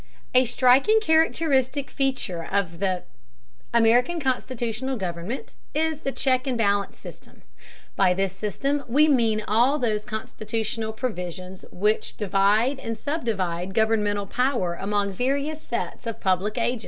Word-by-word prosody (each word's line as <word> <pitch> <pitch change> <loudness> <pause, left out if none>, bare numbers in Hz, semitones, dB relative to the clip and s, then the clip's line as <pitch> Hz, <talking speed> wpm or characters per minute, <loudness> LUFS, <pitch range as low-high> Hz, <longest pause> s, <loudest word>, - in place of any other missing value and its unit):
A 255 +1 +6
striking 260 - +4
characteristic 315 - +2
feature 260 -11 -1
of 185 -1 -2 0.9
American 240 +8 +3
constitutional 255 -2 -2
government 185 +5 -5 0.2
is 315 0 0
the 275 - -3
check 260 -1 +1
and 255 -2 0
balance 200 -3 +1
system. - - -13 0.5
By 180 - +3
this 195 -1 -1
system 275 +9 -2
we 290 +6 +4
mean 225 -6 +2
all 240 +7 +3
those 220 -6 0
constitutional 220 +1 -4
provisions 185 -5 -5
which 210 +4 0
divide 210 +6 +2
and 230 -3 -4
subdivide 195 - -2
governmental 210 -2 +1
power 240 -5 0
among 200 +2 -1
various 280 +7 -1
sets 235 0 -4
of 230 - -4
public 190 +3 0
agents. 240 +1 0
230 Hz, 125 wpm, -25 LUFS, 200-265 Hz, 0.9 s, A